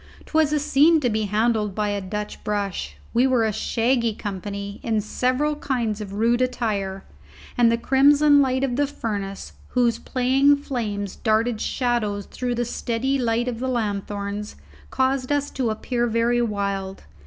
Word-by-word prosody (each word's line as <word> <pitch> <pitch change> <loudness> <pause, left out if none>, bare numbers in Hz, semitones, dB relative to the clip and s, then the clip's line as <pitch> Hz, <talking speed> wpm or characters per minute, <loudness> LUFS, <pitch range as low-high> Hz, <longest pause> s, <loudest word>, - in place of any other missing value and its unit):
'Twas 315 -2 +2
a 300 - +2
scene 300 +3 +4
to 245 -5 0
be 215 0 0
handled 210 -1 0
by 210 -1 0
a 205 -1 -2
Dutch 210 +2 -5
brush. 205 -2 -3 0.2
We 245 +3 +4
were 250 -3 +2
a 215 - 0
shaggy 230 +1 0
company, 200 0 -5
in 225 -2 0
several 255 +7 0
kinds 235 -7 -2
of 200 -2 -7
rude 230 +4 +2
attire, 210 -6 -1 0.5
and 240 -2 +4
the 230 - +2
crimson 285 +4 +5
light 260 -1 +1
of 255 -2 -1
the 290 0 +2
furnace, 200 -7 -5
whose 235 -2 +1
playing 270 +3 +3
flames 210 -8 -4
darted 220 0 +1
shadows 215 -5 -1
through 245 -1 -3
the 240 0 -1
steady 245 +3 -1
light 235 0 0
of 235 -2 -3
the 260 +1 -2
lanthorns, 205 -2 -3 0.3
caused 260 0 0
us 285 0 0
to 250 -4 -1
appear 240 +2 -1
very 235 +1 +2
wild. 200 -3 -2
235 Hz, 160 wpm, -23 LUFS, 210-260 Hz, 0.5 s, crimson